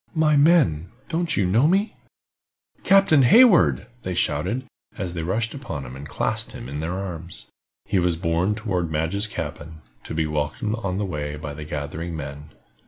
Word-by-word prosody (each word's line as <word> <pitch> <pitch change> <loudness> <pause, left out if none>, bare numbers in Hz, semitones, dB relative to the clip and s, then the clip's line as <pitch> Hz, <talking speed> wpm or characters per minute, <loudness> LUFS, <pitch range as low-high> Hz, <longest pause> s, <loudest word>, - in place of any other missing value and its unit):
"My 155 -1 +3
men, 140 - +4 0.2
don't 170 0 -1
you 100 - +3
know 110 +11 +4
me?" 195 +5 +2 0.9
"Captain 195 -7 +5
Hayward!" 195 - +6 0.2
they 90 -1 -4
shouted, 130 +8 0 0.3
as 95 -5 -3
they 85 - -3
rushed 110 +8 -1
upon 95 - -6
him, 65 +1 -9
and 70 +2 -9
clasped - - -2
him - - -8
in 70 +2 -5
their 80 +3 -3
arms. 90 -3 -6 0.4
He 95 - +1
was 90 -1 +1
borne 85 +5 0
toward 95 -7 -2
Madge's 80 +7 0
cabin, 80 -3 -6 0.2
to - - -6
be 80 -1 +1
welcomed 75 +8 -2
on 95 -2 -2
the 105 - -1
way 75 -5 -4
by 75 -1 -6
the 75 +1 -8
gathering 75 +3 -5
men. 70 +1 -7
90 Hz, 170 wpm, -23 LUFS, 75-115 Hz, 0.9 s, Hayward